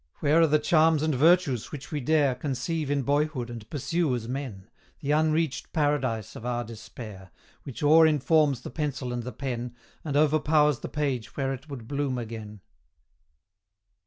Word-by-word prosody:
Where 155 +3 +3
are 165 - +6
the 150 0 +4
charms 155 0 +3
and 155 -1 +1
virtues 155 -3 +3
which 145 -2 -8
we 150 - -1
dare 145 0 +2
Conceive 145 +4 -3
in 145 -1 +1
boyhood 145 -3 0
and 115 -2 -9
pursue 155 0 0
as 115 -2 -5
men, 125 -7 -5 0.3
The 145 - -2
unreached 155 -2 +1
Paradise 135 -8 0
of - - -9
our 120 0 -1
despair, 110 -4 -10 0.4
Which 135 +1 -7
o'er 160 +2 +7
informs 150 -2 +2
the - - -8
pencil 135 -4 -3
and 120 - -2
the 125 +2 -6
pen, 125 -3 -5 0.3
And 145 -3 -1
overpowers 150 -1 +3
the - - -6
page 140 -6 -3
where 135 -1 0
it 135 +4 -9
would 125 -6 -8
bloom 140 -2 -1
again. 110 -3 -7
140 Hz, 165 wpm, -27 LUFS, 120-155 Hz, 0.4 s, o'er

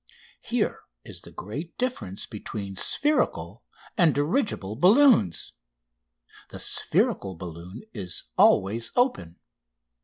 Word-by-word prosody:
Here - - -1 0.3
is - - -9
the - - -13
great 145 - -7
difference 115 - -3
between 100 -2 -7
spherical 295 - 0 0.3
and 170 -7 +4
dirigible 145 - -1
balloons. 200 - +4 1.0
The - - -9
spherical 95 -2 +1
balloon 85 - -9
is 90 -5 -4
always 115 +5 +3
open. 245 - 0
110 Hz, 95 wpm, -26 LUFS, -, 1.0 s, and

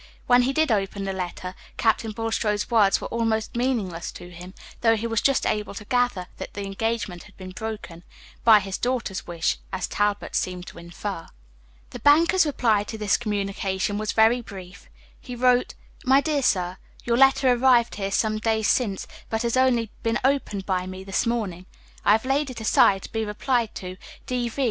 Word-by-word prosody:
When 245 0 +5
he 250 +2 +1
did 315 -1 +1
open 200 -1 -1
the 195 0 -2
letter, 180 0 -5 0.2
Captain 225 0 +1
Bulstrode's 220 -1 -1
words 210 -4 +4
were - - -5
almost 225 -1 -1
meaningless 225 -9 -1
to 175 0 -10
him, 180 +2 -11 0.3
though 225 -1 +4
he 225 +1 -4
was 225 -1 0
just 275 -1 +2
able 210 -1 -1
to 210 - -8
gather 245 -6 0
that - - -8
the 200 -1 -4
engagement 200 -2 -3
had 210 - -19
been 185 -1 -8
broken 205 -5 -7 0.4
by 220 -3 +7
his 195 -1 -5
daughter's 245 -6 -2
wish, 170 -2 -1
as 190 -1 -2
Talbot 205 0 -1
seemed 180 -1 -2
to - - -11
infer. 170 +1 -6 0.6
The - - -7
banker's 330 +4 +5
reply 225 -7 +2
to 220 - -6
this 210 -2 +2
communication 200 -2 -2
was 215 0 -1
very 225 +3 +4
brief; 195 -4 -11 0.3
he 250 - -8
wrote: 250 0 +2 0.3
"MY 265 +2 +5
DEAR 300 -2 0
SIR 180 -6 +1 0.3
Your 235 0 +1
letter 270 0 +5
arrived 245 -1 +4
here 195 -1 -3
some 215 +2 0
days 220 -1 +1
since, 205 -7 +1 0.2
but 225 +1 -1
has 235 0 0
only 245 -4 +2
been 230 +1 0
opened 260 -8 0
by 185 -1 -1
me 185 0 -7
this 195 +3 -1
morning. 195 -6 -2 0.4
I 205 - +5
have 220 +3 +1
laid 275 +2 +1
it 255 - -7
aside, 200 -3 +4
to - - -9
be 225 0 -1
replied 225 +2 -1
to, 185 0 -7 0.3
D.V. 245 0 -3
220 Hz, 185 wpm, -24 LUFS, 195-240 Hz, 0.6 s, by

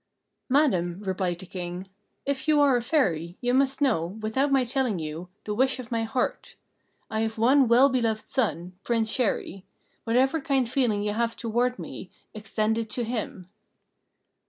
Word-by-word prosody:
"Madam," 190 - +2
replied 185 -2 -1
the 190 - -9
King, 180 +1 -6 0.4
"if 280 +1 -2
you 305 -1 +5
are 280 -3 +5
a 240 - +1
Fairy, 175 - 0
you 245 0 0
must 270 +2 +2
know, 260 - +3 0.2
without 260 +7 0
my 270 -1 +4
telling 250 -4 0
you, 160 +2 -6 0.2
the 210 - -2
wish 260 +4 +2
of 250 -3 -9
my 230 -1 0
heart. 255 - -2 0.6
I 220 - -1
have 220 0 -1
one 260 +4 +4
well 240 +4 +6
beloved 230 -5 -1
son, 180 -8 -1
Prince 225 -2 0
Chéri: 215 -5 -1 0.4
whatever 265 +7 +2
kindly 270 -5 0
feeling 230 -7 +1
you 210 0 -1
have 230 +1 -1
toward 240 +2 0
me, 185 - -8 0.2
extend 215 +1 -1
it 225 -1 -4
to 240 +3 -3
him." 220 -5 -4
230 Hz, 165 wpm, -26 LUFS, 205-265 Hz, 0.6 s, well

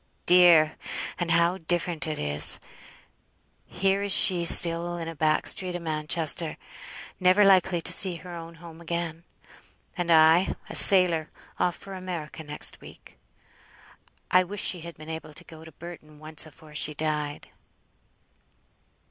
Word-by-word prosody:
Dear! 170 -3 +5 0.4
and 175 -1 -3
how 170 +2 +1
different 170 -2 -2
it 155 - -4
is! 75 0 +1 1.1
Here 195 +1 -1
is 200 0 -3
she 175 -2 +3
still 170 +1 +6
in 165 -1 -7
a 165 - -6
back 155 0 0
street 180 -2 -3
o' - - -4
Manchester, 160 0 -1 0.6
never 185 +3 +3
likely 185 -3 +2
to - - -2
see 185 -3 +1
her 175 +1 -11
own 165 0 -10
home 165 0 -14
again; 170 0 -6 0.7
and 175 -3 -4
I, 160 +2 +4
a - - -10
sailor, 175 -5 +5 0.3
off 175 - 0
for 195 - -12
America 175 -4 -8
next 150 0 -4
week. - - -16 1.1
I 185 0 +4
wish 195 +2 -5
she 180 - 0
had 170 0 -11
been 155 0 -13
able 160 -1 -9
to - - -7
go 160 -1 -15
to 160 - -14
Burton 155 -1 -13
once 155 +1 -4
afore 155 0 -17
she 150 +1 -2
died." 150 -1 -4
170 Hz, 150 wpm, -25 LUFS, 155-180 Hz, 1.1 s, still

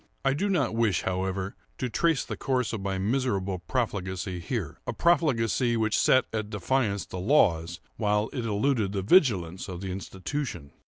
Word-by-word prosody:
I 135 - +4
do 200 +9 -1
not 145 - +1
wish, 115 -6 +1
however, 95 +1 -2 0.2
to 130 - -1
trace 160 +2 +1
the - - -4
course 125 -4 -1
of 110 - -3
my 95 0 -2
miserable 100 -3 0
profligacy 95 -3 -2
here—a 95 - -4
profligacy 125 - +2
which 110 -1 +1
set 130 - +4
at 110 -2 -2
defiance 105 0 0
the 90 - -6
laws, 85 - +2 0.2
while 105 +1 +1
it 125 -4 -3
eluded 110 -1 +1
the 95 -2 -1
vigilance 95 - +3
of 90 -2 -6
the 95 -1 -4
institution. 95 - -5
105 Hz, 160 wpm, -27 LUFS, 95-130 Hz, 0.2 s, I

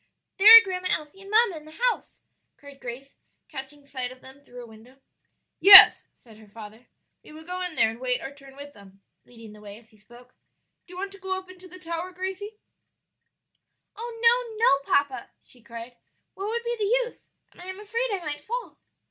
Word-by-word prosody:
"There 400 +1 +3
are 460 - +7
Grandma 370 -2 -5
Elsie 305 +5 -3
and 390 - -14
mamma 430 -5 +2
in 305 - -13
the 310 +1 -16
house," - - -12 0.4
cried 285 -1 -16
Grace, 255 +3 -10 0.3
catching 280 0 -11
sight 260 -3 -5
of 255 - -15
them 265 +2 -17
through 245 -2 -13
a - - -11
window. 230 +4 -18 0.6
"Yes," 385 +3 +9
said 225 -3 -21
her 215 -1 -18
father, 220 +3 -14 0.4
"we - - -16
will 315 +1 -13
go 360 +2 -6
in 360 -3 -5
there 220 - +2
and 225 - -13
wait 250 -1 -2
our 275 - -9
turn 275 -1 -17
with 285 +1 -12
them," 195 -1 -19 0.2
leading 230 -3 -15
the 210 - -17
way 205 0 -12
as 225 -1 -22
he 215 - -24
spoke. 240 +4 -20 0.5
"Do 360 - -15
you - - -11
want 390 +1 -6
to 395 - -15
go 380 0 -4
up 375 0 -11
into 370 0 -16
the 365 +1 -13
tower, 340 0 -7
Gracie?" 380 +3 -7 1.4
"Oh 460 0 -9
no, 470 -1 +2
no, 280 - +1
papa!" 285 -2 -1
she 245 - -20
cried, 235 +1 -11 0.4
"what 395 +2 -7
would 470 +2 -4
be 475 0 -4
the 475 +4 0
use? - - -18 0.2
and - - -18
I - - -11
am 375 +1 -8
afraid 460 +4 -4
I 375 -4 -5
might 295 -1 -5
fall." 480 +9 -7
300 Hz, 210 wpm, -24 LUFS, 245-390 Hz, 1.4 s, Yes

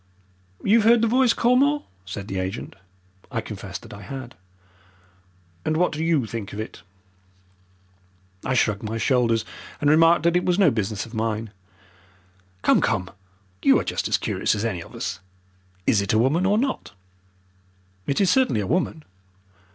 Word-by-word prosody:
"You've 220 +2 +4
heard 230 0 +5
the - - +4
voice, 250 +1 +4
Colmore?" 270 +6 +3 0.2
said 95 +2 -6
the 95 -2 -3
agent. 95 +4 -4 0.6
I 120 - -1
confessed 100 -4 -7
that - - -11
I 100 - -10
had. 130 0 -7 1.3
"And 155 - 0
what 180 +2 +2
do 155 0 -3
YOU 160 -7 +2
think 110 -2 -6
of 105 - -6
it?" 110 - -7 1.6
I 130 - 0
shrugged 105 -4 +1
my 110 +1 -4
shoulders, 115 -1 +2 0.3
and 145 0 +3
remarked 165 +1 +5
that 170 +1 +3
it 180 - +2
was 180 0 +1
no 200 - +5
business 110 -2 -2
of 115 - -14
mine. 110 -1 -2 1.1
"Come, - - +4
come, 90 - 0 0.5
you - - +5
are - - -2
just - - -2
as - - +2
curious - - 0
as 105 +2 -2
any 95 -7 -2
of - - -12
us. - - -4 0.7
Is 105 - +3
it 100 0 -1
a - - +4
woman 150 +11 +2
or 205 +2 +3
not?" 265 +3 -2 1.1
"It 140 - 0
is 190 -3 +4
certainly 255 - +2
a - - -3
woman." 165 - -1
130 Hz, 165 wpm, -24 LUFS, 110-180 Hz, 1.6 s, heard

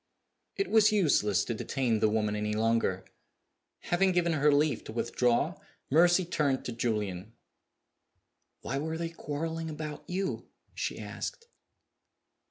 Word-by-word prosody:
It 395 - -1
was 220 -1 +6
useless 145 - +2
to 120 - -2
detain 120 0 -1
the 110 0 +3
woman 105 -1 0
any 105 0 -1
longer. 110 -4 +1 0.9
Having 185 +2 +3
given 170 -1 +2
her 150 -1 +4
leave 145 -3 +2
to - - -7
withdraw, 120 +7 0 0.3
Mercy 175 +4 +5
turned 145 -6 0
to - - -3
Julian. 105 -4 -2 1.3
"Why 135 - -3
were 160 +2 -3
they 165 0 -3
quarreling 165 +1 -4
about 155 -1 -6
you?" 190 +2 -2 0.3
she - - -3
asked. 465 0 -6
145 Hz, 130 wpm, -30 LUFS, 115-170 Hz, 1.3 s, was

